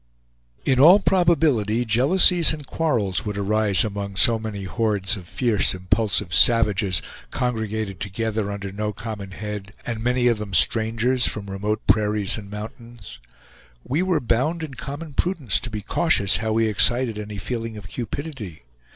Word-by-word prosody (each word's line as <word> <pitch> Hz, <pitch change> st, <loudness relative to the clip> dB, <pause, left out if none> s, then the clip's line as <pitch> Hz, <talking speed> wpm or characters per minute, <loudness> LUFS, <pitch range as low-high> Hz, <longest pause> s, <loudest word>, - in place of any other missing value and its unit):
In 130 Hz, -2 st, +2 dB
all 175 Hz, +9 st, +7 dB
probability 155 Hz, -, +1 dB
jealousies 165 Hz, -, +4 dB
and 150 Hz, -2 st, -8 dB
quarrels 115 Hz, -, -1 dB
would 105 Hz, -1 st, -5 dB
arise 100 Hz, -2 st, +3 dB
among 100 Hz, -2 st, -5 dB
so 115 Hz, +3 st, +5 dB
many 110 Hz, -3 st, -6 dB
hordes 100 Hz, 0 st, -1 dB
of 90 Hz, -4 st, -10 dB
fierce 110 Hz, -5 st, +1 dB
impulsive 95 Hz, -1 st, 0 dB
savages, 105 Hz, -3 st, +4 dB, 0.3 s
congregated 110 Hz, -5 st, -3 dB
together 105 Hz, +2 st, -3 dB
under 100 Hz, -1 st, -6 dB
no 105 Hz, +2 st, -4 dB
common 105 Hz, -3 st, -7 dB
head, 105 Hz, 0 st, -7 dB
and 115 Hz, -2 st, -5 dB
many 125 Hz, 0 st, 0 dB
of 115 Hz, -3 st, +1 dB
them 100 Hz, -3 st, -4 dB
strangers, 115 Hz, +7 st, +2 dB
from 100 Hz, -2 st, -4 dB
remote 105 Hz, +2 st, -3 dB
prairies 105 Hz, -2 st, +1 dB
and 100 Hz, -3 st, -9 dB
mountains. 110 Hz, -, -10 dB, 0.6 s
We 150 Hz, +6 st, -2 dB
were 185 Hz, -4 st, 0 dB
bound 135 Hz, +8 st, -1 dB
in 150 Hz, -4 st, -7 dB
common 145 Hz, +4 st, -8 dB
prudence 155 Hz, -, +1 dB
to 120 Hz, -, -5 dB
be 105 Hz, -2 st, -6 dB
cautious 100 Hz, -, +3 dB
how 110 Hz, 0 st, -2 dB
we 115 Hz, 0 st, +1 dB
excited 115 Hz, +2 st, +2 dB
any 105 Hz, -1 st, -7 dB
feeling 115 Hz, +2 st, -5 dB
of 100 Hz, -2 st, -10 dB
cupidity. 120 Hz, -, -7 dB
110 Hz, 150 wpm, -22 LUFS, 100-125 Hz, 0.6 s, all